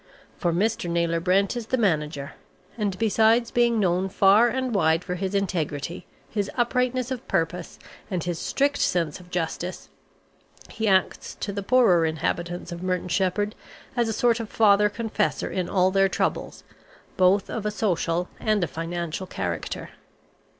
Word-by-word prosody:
For 175 Hz, -, 0 dB
Mr. 195 Hz, +1 st, 0 dB
Naylor 170 Hz, 0 st, +1 dB
Brent 190 Hz, +5 st, +2 dB
is 235 Hz, -2 st, -5 dB
the 260 Hz, -, +1 dB
manager, 150 Hz, -, -1 dB, 0.4 s
and 205 Hz, -4 st, -2 dB
besides 225 Hz, +2 st, +3 dB
being 235 Hz, -2 st, +3 dB
known 185 Hz, -1 st, +1 dB
far 200 Hz, +5 st, +5 dB
and 255 Hz, 0 st, -1 dB
wide 165 Hz, -3 st, +2 dB
for 180 Hz, -, -4 dB
his 190 Hz, +2 st, -3 dB
integrity, 170 Hz, -5 st, -2 dB, 0.2 s
his 205 Hz, -2 st, -2 dB
uprightness 250 Hz, +1 st, 0 dB
of 255 Hz, -1 st, -5 dB
purpose, 170 Hz, +1 st, -2 dB, 0.3 s
and 180 Hz, -5 st, -2 dB
his 175 Hz, -2 st, -3 dB
strict 285 Hz, +1 st, 0 dB
sense 165 Hz, -3 st, 0 dB
of 180 Hz, 0 st, -15 dB
justice, 175 Hz, +1 st, -4 dB, 0.8 s
he 220 Hz, -, -2 dB
acts 190 Hz, -2 st, +1 dB
to 200 Hz, -, -3 dB
the 200 Hz, -, -3 dB
poorer 200 Hz, -6 st, +4 dB
inhabitants 170 Hz, +3 st, -3 dB
of 170 Hz, 0 st, -6 dB
Merton 180 Hz, -1 st, -2 dB
Sheppard 205 Hz, +3 st, 0 dB, 0.4 s
as 240 Hz, -2 st, +1 dB
a -, -, -1 dB
sort 235 Hz, +1 st, +2 dB
of 225 Hz, -2 st, -5 dB
father 210 Hz, -1 st, +4 dB
confessor 215 Hz, -1 st, -2 dB
in 180 Hz, -2 st, -2 dB
all 185 Hz, -1 st, +3 dB
their 195 Hz, 0 st, +3 dB
troubles, -, -, -2 dB, 0.5 s
both 190 Hz, +2 st, +3 dB
of 225 Hz, -, -4 dB
a 210 Hz, -, 0 dB
social 180 Hz, -4 st, 0 dB
and 215 Hz, -3 st, +1 dB
a -, -, 0 dB
financial 165 Hz, +4 st, -4 dB
character. 90 Hz, -, -4 dB
190 Hz, 155 wpm, -25 LUFS, 175-220 Hz, 0.8 s, far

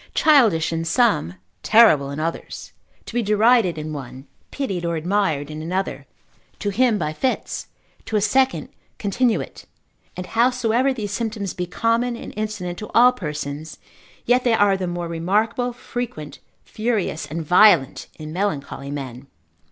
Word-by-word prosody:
Childish 220 Hz, -, +4 dB
in 165 Hz, 0 st, -2 dB
some, 165 Hz, -, +1 dB, 0.3 s
terrible 215 Hz, -12 st, +5 dB
in 140 Hz, +2 st, -5 dB
others; 165 Hz, +2 st, -5 dB, 0.3 s
to -, -, -9 dB
be 240 Hz, -, +1 dB
derided 215 Hz, -3 st, +3 dB
in 155 Hz, 0 st, -5 dB
one, 135 Hz, -1 st, -8 dB, 0.2 s
pitied 195 Hz, -11 st, -3 dB
or 170 Hz, 0 st, -1 dB
admired 160 Hz, -4 st, -1 dB
in 155 Hz, 0 st, -6 dB
another; 185 Hz, +4 st, -3 dB, 0.5 s
to 205 Hz, -, -2 dB
him 235 Hz, +1 st, +2 dB
by 155 Hz, -5 st, -2 dB
fits, 255 Hz, +10 st, -2 dB, 0.4 s
to 220 Hz, -, -4 dB
a -, -, +4 dB
second 260 Hz, +6 st, +1 dB, 0.3 s
continuate: 225 Hz, +3 st, -1 dB, 0.5 s
and 180 Hz, -, -4 dB
howsoever 245 Hz, +3 st, +2 dB
these 215 Hz, -6 st, -4 dB
symptoms 215 Hz, -4 st, -3 dB
be 180 Hz, -1 st, -4 dB
common 230 Hz, +5 st, 0 dB
and -, -, -9 dB
incident 205 Hz, -5 st, -4 dB
to 215 Hz, -, -7 dB
all 245 Hz, +2 st, +7 dB
persons, 150 Hz, -, -6 dB, 0.5 s
yet 250 Hz, +1 st, +3 dB
they 240 Hz, -2 st, +3 dB
are 205 Hz, -2 st, +4 dB
the 190 Hz, -1 st, -3 dB
more 175 Hz, 0 st, -3 dB
remarkable, 210 Hz, +9 st, 0 dB
frequent, 240 Hz, -11 st, -6 dB, 0.2 s
furious 215 Hz, -8 st, -2 dB
and 160 Hz, +1 st, -5 dB
violent 180 Hz, -5 st, +4 dB
in 155 Hz, 0 st, -8 dB
melancholy 150 Hz, -7 st, -3 dB
men. 135 Hz, -2 st, -7 dB
200 Hz, 145 wpm, -22 LUFS, 160-230 Hz, 0.5 s, all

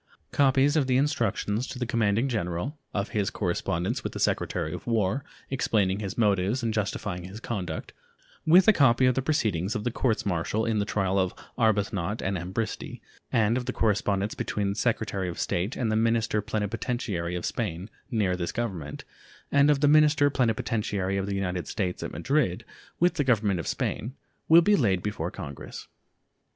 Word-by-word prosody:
Copies 140 Hz, +1 st, +3 dB
of 145 Hz, -4 st, +2 dB
the 130 Hz, -1 st, +3 dB
instructions 130 Hz, -5 st, 0 dB
to -, -, -7 dB
the 125 Hz, -, -2 dB
commanding 115 Hz, 0 st, +1 dB
general, 105 Hz, -, -2 dB, 0.2 s
of 100 Hz, +1 st, -2 dB
his 100 Hz, -2 st, 0 dB
correspondence 85 Hz, -2 st, -2 dB
with -, -, -4 dB
the -, -, -5 dB
Secretary 80 Hz, -, 0 dB
of -, -, -8 dB
War, 115 Hz, +2 st, +1 dB, 0.3 s
explaining 100 Hz, -7 st, +1 dB
his 100 Hz, -3 st, -5 dB
motives 105 Hz, +2 st, +2 dB
and 115 Hz, -1 st, 0 dB
justifying 100 Hz, -4 st, -2 dB
his 95 Hz, +4 st, -8 dB
conduct, 95 Hz, -9 st, -4 dB, 0.5 s
with 180 Hz, +4 st, +6 dB
a 220 Hz, -, +8 dB
copy 130 Hz, -, +4 dB
of 125 Hz, -, +4 dB
the 135 Hz, -, 0 dB
proceedings 110 Hz, -, 0 dB
of 105 Hz, -, -2 dB
the 120 Hz, -, -1 dB
courts 115 Hz, -1 st, 0 dB
martial 100 Hz, +4 st, 0 dB
in 110 Hz, -2 st, +1 dB
the 100 Hz, -, 0 dB
trial 95 Hz, -2 st, 0 dB
of 95 Hz, -1 st, 0 dB, 0.2 s
Arbuthnot 105 Hz, -3 st, +1 dB
and 100 Hz, +1 st, -1 dB
Ambristie, 95 Hz, +5 st, -4 dB, 0.3 s
and 115 Hz, +1 st, +3 dB
of 125 Hz, -1 st, -4 dB
the 125 Hz, -, -1 dB
correspondence 105 Hz, -1 st, +1 dB
between 100 Hz, -1 st, -2 dB
the 100 Hz, -, -2 dB
Secretary 105 Hz, -4 st, -1 dB
of 85 Hz, -, -6 dB
State 90 Hz, +8 st, -1 dB
and 115 Hz, -4 st, -1 dB
the -, -, +1 dB
minister 115 Hz, -1 st, +2 dB
plenipotentiary 105 Hz, -4 st, -2 dB
of 90 Hz, -, -3 dB
Spain 85 Hz, +4 st, -3 dB, 0.2 s
near 105 Hz, -7 st, +1 dB
this 85 Hz, -2 st, -3 dB
Government, 95 Hz, -11 st, -4 dB, 0.5 s
and 140 Hz, +1 st, +5 dB
of 145 Hz, -2 st, +3 dB
the 145 Hz, -, +5 dB
minister 150 Hz, -1 st, +5 dB
plenipotentiary 105 Hz, -6 st, 0 dB
of 95 Hz, 0 st, -2 dB
the 100 Hz, -, -2 dB
United 90 Hz, -2 st, -2 dB
States 90 Hz, -3 st, -2 dB
at -, -, -4 dB
Madrid 135 Hz, -11 st, 0 dB, 0.3 s
with 175 Hz, 0 st, +4 dB
the 160 Hz, -5 st, 0 dB
Government 105 Hz, -7 st, +2 dB
of 80 Hz, -, -5 dB
Spain, 120 Hz, +6 st, -2 dB, 0.3 s
will 165 Hz, +1 st, +8 dB
be 210 Hz, +4 st, +5 dB
laid 95 Hz, -, +1 dB
before 95 Hz, -5 st, -2 dB
Congress. 75 Hz, -8 st, -8 dB
105 Hz, 180 wpm, -27 LUFS, 95-125 Hz, 0.5 s, a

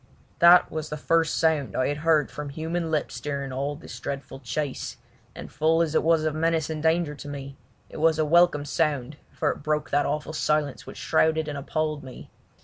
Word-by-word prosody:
That 175 Hz, +1 st, +7 dB
was 155 Hz, -1 st, -4 dB
the 150 Hz, -, -4 dB
first 165 Hz, +1 st, +1 dB
sound 160 Hz, -4 st, +1 dB
I 130 Hz, -, +1 dB
had 145 Hz, -, -2 dB
heard 155 Hz, -1 st, +2 dB
from 150 Hz, -1 st, -6 dB
human 165 Hz, +3 st, -3 dB
lips 155 Hz, -2 st, -2 dB
during 140 Hz, -2 st, -3 dB
all 140 Hz, +3 st, -2 dB
this 145 Hz, -, -10 dB
dreadful 140 Hz, -1 st, -6 dB
chase, 135 Hz, +3 st, -4 dB, 0.4 s
and -, -, -9 dB
full 165 Hz, +2 st, +2 dB
as 160 Hz, -2 st, -3 dB
it -, -, +3 dB
was 165 Hz, -1 st, +3 dB
of 155 Hz, -1 st, 0 dB
menace 160 Hz, 0 st, 0 dB
and 155 Hz, -1 st, -4 dB
danger 160 Hz, -1 st, +1 dB
to 145 Hz, -, -10 dB
me 140 Hz, -1 st, -7 dB, 0.3 s
it -, -, -11 dB
was 160 Hz, 0 st, +3 dB
a 155 Hz, -, +2 dB
welcome 165 Hz, -2 st, +4 dB
sound 145 Hz, -2 st, -1 dB
for -, -, 0 dB
it -, -, -8 dB
broke 150 Hz, +1 st, -1 dB
that 145 Hz, +1 st, +2 dB
awful 150 Hz, +2 st, -3 dB
silence 150 Hz, -3 st, -1 dB
which -, -, -9 dB
shrouded 160 Hz, 0 st, +1 dB
and 150 Hz, -, -4 dB
appalled 155 Hz, +1 st, -2 dB
me. 130 Hz, -1 st, -11 dB
150 Hz, 205 wpm, -26 LUFS, 145-160 Hz, 0.4 s, That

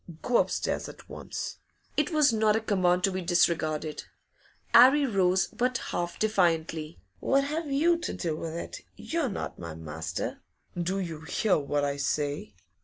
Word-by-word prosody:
Go 245 Hz, -, +3 dB
upstairs -, -, 0 dB
at -, -, -13 dB
once!' -, -, -6 dB, 0.4 s
It 300 Hz, +1 st, +1 dB
was 300 Hz, -6 st, +4 dB
not 215 Hz, -1 st, +3 dB
a -, -, +2 dB
command 185 Hz, -4 st, +2 dB
to 195 Hz, -, +3 dB
be 185 Hz, 0 st, -3 dB
disregarded. 160 Hz, -3 st, +1 dB, 0.7 s
'Arry 280 Hz, +3 st, +8 dB
rose, 190 Hz, -5 st, +2 dB
but 250 Hz, +1 st, 0 dB
half 175 Hz, 0 st, -2 dB
defiantly. 165 Hz, -, 0 dB, 0.2 s
'What 275 Hz, +1 st, +2 dB
have 300 Hz, +1 st, -3 dB
you 335 Hz, +5 st, +3 dB
to 340 Hz, -, -3 dB
do 165 Hz, -4 st, -2 dB
with 160 Hz, +1 st, -5 dB
it? 170 Hz, -, -6 dB
You're 325 Hz, -5 st, -2 dB
not 200 Hz, -, -5 dB
my 85 Hz, -2 st, -6 dB
master.' 80 Hz, 0 st, -5 dB, 0.4 s
'Do 175 Hz, +2 st, -1 dB
you 165 Hz, -5 st, -4 dB
hear 185 Hz, +3 st, +1 dB
what 145 Hz, 0 st, -1 dB
I 140 Hz, 0 st, -2 dB
say? 145 Hz, -5 st, -2 dB
180 Hz, 160 wpm, -28 LUFS, 155-250 Hz, 0.7 s, Arry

